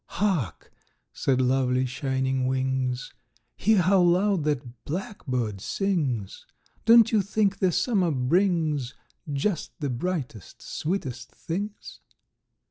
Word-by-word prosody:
"Hark!" 175 - -1 0.4
said 130 -2 +1
lovely 130 0 +2
Shining 130 0 -1
Wings, 130 -1 -1 0.4
"Hear 210 -3 +3
how 190 +1 +4
loud 180 -1 +3
that 125 -5 -3
blackbird 130 - -3
sings! 140 - -2 0.4
Don't 230 0 +7
you 215 -3 +4
think 200 0 0
the 185 -2 +3
summer 190 -2 +1
brings 155 -1 +1 0.4
Just 160 +7 -2
the 145 -4 -2
brightest, 125 - -4
sweetest 135 -8 -4
things? 200 +5 -6
150 Hz, 105 wpm, -26 LUFS, 130-195 Hz, 0.4 s, Don't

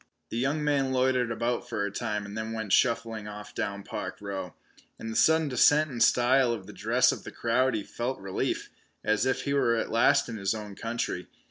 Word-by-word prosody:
The 115 - -3
young 140 +5 0
man 140 -3 +1
loitered 130 -2 +2
about 115 +1 -2
for 100 - -1
a 100 - -3
time 105 -1 -3
and 100 +1 -8
then 110 0 -4
went 110 -3 -2
shuffling 115 -3 +1
off 105 0 -9
down 100 0 -3
Park - - -5
Row. 95 -4 -5 0.4
In 115 - -6
the - - -6
sudden 160 +3 +4
descent 145 +3 +4
in 120 -2 -5
style 125 +1 +4
of 105 -5 -6
the - - -11
dress - - +3
of - - -6
the - - -7
crowd 125 +2 +1
he 105 - -2
felt 125 +5 -4
relief, 95 -1 -3 0.3
and - - 0
as 110 +4 +2
if 130 - 0
he 140 - -1
were 120 -4 +3
at 115 - -2
last 115 - +4
in 115 -2 -5
his 100 +1 0
own 105 -2 -7
country. 115 -5 -3
115 Hz, 220 wpm, -28 LUFS, 105-130 Hz, 0.4 s, sudden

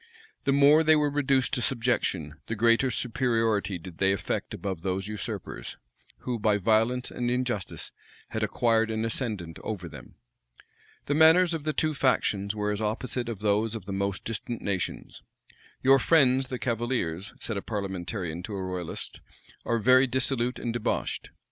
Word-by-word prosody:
The 140 - +3
more 145 +3 +6
they 155 0 +6
were 150 -1 +2
reduced 135 -2 +1
to 125 - +1
subjection, 105 - -1
the 115 - -2
greater 115 +4 +3
superiority 115 -5 0
did 85 0 -11
they 95 0 +3
affect 100 - -3
above 95 -4 -4
those 95 +2 -2
usurpers, 95 - -5 0.4
who, 125 -2 -3
by 105 -1 +3
violence 115 +5 +1
and 120 0 -2
injustice, 125 -5 -2 0.4
had - - -3
acquired 115 -1 +2
an 110 0 -1
ascendant 105 -8 -3
over 95 -5 -5
them. 75 -5 -12 0.9
The 145 - 0
manners 165 +3 +6
of 155 -2 -4
the 155 - 0
two 155 0 +1
factions 105 -7 +1
were 105 0 -1
as 105 +1 -2
opposite 120 +3 -2
as 115 - -4
those 105 +2 +1
of 105 -5 -7
the 100 - -5
most 100 0 -2
distant 115 +1 -4
nations. 95 -3 -3 0.6
"Your 135 +1 +6
friends, 135 -5 +4
the 125 - -4
cavaliers," 115 -7 -2
said 115 - -3
a 100 - -2
parliamentarian 95 -4 -4
to 100 +3 -6
a 95 - -3
royalist, 90 -2 -5 0.4
"are 115 - +1
very 130 +4 +5
dissolute 125 -1 0
and 115 - -3
debauched." 120 -2 -2
115 Hz, 160 wpm, -27 LUFS, 100-130 Hz, 0.9 s, more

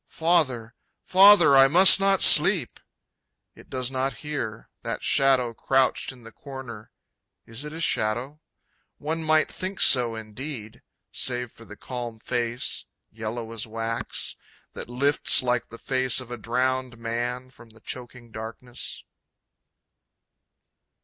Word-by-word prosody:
Father, 135 -9 0 0.3
Father, 190 -6 +6
I 135 0 +7
must 185 +7 +7
not 195 0 +4
sleep! - - +5 0.7
It - - -18
does 130 -1 -3
not 135 +1 -2
hear 120 -7 -5
that - - -5
shadow 130 -3 +2
crouched 130 +3 0
in 125 -3 -16
the 115 - -13
corner... 120 -5 -10 0.6
Is 115 +6 -8
it 150 - -7
a 160 - -8
shadow? 130 +1 -2 0.6
One 160 +2 -4
might 155 0 +2
think 185 +1 -5
so 120 -3 +4
indeed, 110 +1 -8 0.3
save 125 -2 -2
for 115 - -17
the - - -13
calm 120 -3 -7
face, 120 +1 -3 0.3
yellow 115 +1 -6
as 115 0 -6
wax, 115 +1 -4 0.4
that - - -9
lifts 140 +2 +3
like 125 -1 -1
the 115 - -11
face 130 0 0
of 125 -2 -10
a 120 - -5
drowned 125 +2 -2
man 120 +2 -5
from 120 -3 -18
the 115 0 -20
choking 120 -1 -10
darkness. 115 +3 -8
125 Hz, 130 wpm, -24 LUFS, 115-135 Hz, 0.7 s, I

